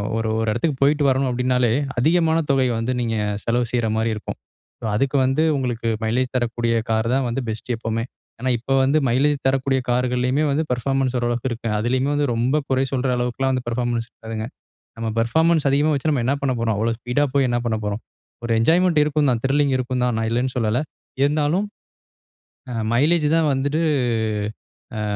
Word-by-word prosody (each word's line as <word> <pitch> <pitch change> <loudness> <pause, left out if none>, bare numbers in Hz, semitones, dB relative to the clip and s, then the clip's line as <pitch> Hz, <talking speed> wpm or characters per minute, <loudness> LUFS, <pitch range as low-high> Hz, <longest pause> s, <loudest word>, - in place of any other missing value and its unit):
அ - - -3
ஓர் 115 0 -1
ஒரு 110 - -1
எடத்துக்கு 135 +6 -1
போய்ட்டு 145 +1 +3
வரணு 135 +1 +1
அப்டின்னாலே, 125 -1 +1 0.3
அதிகமான 165 +3 +3
தொகை 130 -2 +3
வந்து 115 +3 -1
நீங்க 115 -1 -1 0.3
செலவு 120 +1 +1
செய்ற 120 -2 +1
மாரி 115 +1 +1
இருக்கும். 105 - -6 0.6
அதுக்கு 135 +6 +1
வந்து 135 +4 +1
உங்களுக்கு 120 -3 -2
மைலேஜ் 125 +4 0
தரக்கூடிய 120 -1 0 0.2
கார் 110 0 +1
தான் 130 -2 0
பெஸ்ட் 110 +3 -5
எப்பவுமே. 115 0 -2 0.4
ஏன்னா 130 +1 0
இப்ப 135 +4 -1
வந்து 140 +4 +3
மைலேஜ் 140 +5 +2
தரக்கூடிய 135 0 +1
கார்கள்லயுமே 125 +3 +1
வந்து 145 +3 +1
பெர்ஃபார்மன்ஸ் 130 +1 0
ஓரளவுக்கு 120 +1 -1
இருக்கும். 115 -2 -3
அதுலயுமே 130 +5 0
வந்து 145 0 +1
ரொம்ப 125 +6 +1
குறை 130 0 +2
சொல்ற 130 0 0
அளவுக்குல்லாம் 125 +2 -1
வந்து 125 -1 -2
பெர்ஃபார்மன்ஸ் 120 -1 -1
இருக்காதுங்க. 110 -1 -6 0.5
நம்ம 115 0 -2
பெர்ஃபார்மன்ஸ் 160 +6 +2
அதிகமா 145 +3 +2
வச்சு 145 +3 0
நம்ம 125 -5 0
என்ன 135 +3 +2
பண்ண 135 -2 +1
போறோம். 115 -2 0
அவ்வளோ 115 +2 0
ஸ்பீடா 125 +5 0
போய் 135 -2 +3
என்ன 120 - +1
பண்ண 110 -2 0
போறோம்? 105 +2 -3 0.4
ஒரு 120 - -2
என்ஜாய்மென்ட் 165 +5 +3
இருக்கும் 150 -2 +1
தான், 115 - -1
த்ரில்லிங் 140 0 +2
இருக்கும் 125 0 -1
தான், 120 - 0
நான் 110 0 -1
இல்லன்னு 125 +2 -1
சொல்லல. 115 +2 +1 0.4
இருந்தாலும், 150 +7 +1 1.0
அ - - -4 0.2
மைலேஜ் 150 +4 +3
தான் 155 -2 +2
வந்துட்டு 145 +4 0 1.2
அ - - -2
125 Hz, 175 wpm, -22 LUFS, 115-140 Hz, 1.2 s, போய்ட்டு